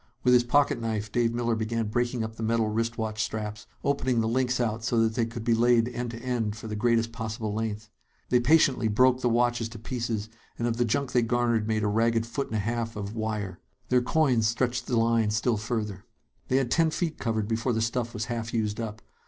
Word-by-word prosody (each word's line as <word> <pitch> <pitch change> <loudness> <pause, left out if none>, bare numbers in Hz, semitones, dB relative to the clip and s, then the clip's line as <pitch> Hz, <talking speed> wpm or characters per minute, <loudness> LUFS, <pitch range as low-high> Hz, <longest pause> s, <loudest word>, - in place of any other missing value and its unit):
With 125 - +5
his 125 -1 +6
pocket 135 0 +2
knife, 110 -2 -2
Dave 120 0 +2
Miller 120 0 0
began 115 +1 -1
breaking 120 +1 0
up 110 0 -5
the 115 - -8
metal 115 0 +1
wrist 115 +2 -1
watch 110 -1 -2
straps, 105 -1 -4 0.2
opening 130 -4 +1
the 110 - +1
links 125 +2 +1
out 115 -2 -1
so 120 0 +1
that 110 0 +2
they 115 -1 0
could 115 0 -6
be 115 0 +2
laid 120 0 +4
end 120 0 -4
to 115 - -6
end 115 -4 -2
for 110 - -10
the 110 -1 -4
greatest 115 +1 +1
possible 110 -2 -4
length. 110 -1 -3 0.4
They 125 - +4
patiently 130 -3 +4
broke 125 +4 +3
the 125 - +2
watches 120 -1 +1
to 115 - -9
pieces, 115 -2 -3 0.3
and 120 - -1
of 115 -1 -1
the 120 - +2
junk 125 +4 -1
they 125 - +3
garnered 120 -2 +1
made 110 -1 0
a - - +2
ragged 115 +2 +2
foot 120 +4 -3
and 110 - -5
a - - +1
half 115 +1 -2
of 100 0 -5
"wire." 105 -4 -3 0.3
Their 125 0 +4
coins 125 -4 +2
stretched 125 +2 -1
the 120 - +1
line 115 -1 +3
still 110 +2 +1
further. 105 -2 -3 0.4
They 130 - +1
had 130 -3 0
ten 165 +3 +4
feet 160 0 -2
covered 110 -3 -1
before 115 +3 0
the 110 - 0
stuff 115 +1 -1
was 110 +1 -2
half 115 -1 -4
used 105 -1 -1
up. 110 0 -5
115 Hz, 225 wpm, -27 LUFS, 110-120 Hz, 0.4 s, his